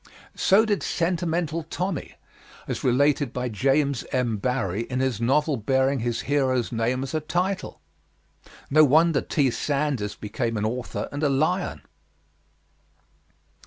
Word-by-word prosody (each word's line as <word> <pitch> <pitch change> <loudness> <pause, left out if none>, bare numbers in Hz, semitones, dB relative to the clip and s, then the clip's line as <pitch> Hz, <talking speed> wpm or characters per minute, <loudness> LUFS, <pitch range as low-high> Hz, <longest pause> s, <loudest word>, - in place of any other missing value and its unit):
So 205 +3 +4
did 205 -3 0
Sentimental 170 -2 -1
Tommy, 170 +1 -4 0.5
as - - -4
related 140 +1 +2
by 125 0 -3
James 135 +3 +1
M. 120 -4 0
Barrie 110 -2 -1
in 125 - -2
his 130 -4 -1
novel 145 +4 +2
bearing 130 +4 +1
his 115 0 -2
hero's 130 -4 0
name 120 +3 0
as 135 - -6
a 155 - +1
title. 180 +5 -2 0.9
No 155 +2 +7
wonder 155 +1 +4
T. 140 -5 +1
Sandys 140 -7 -1
became 115 +2 -3
an 105 - -1
author 120 +2 -3
and 145 - -4
a 150 - +2
lion! 155 +7 0
135 Hz, 130 wpm, -25 LUFS, 120-155 Hz, 0.9 s, No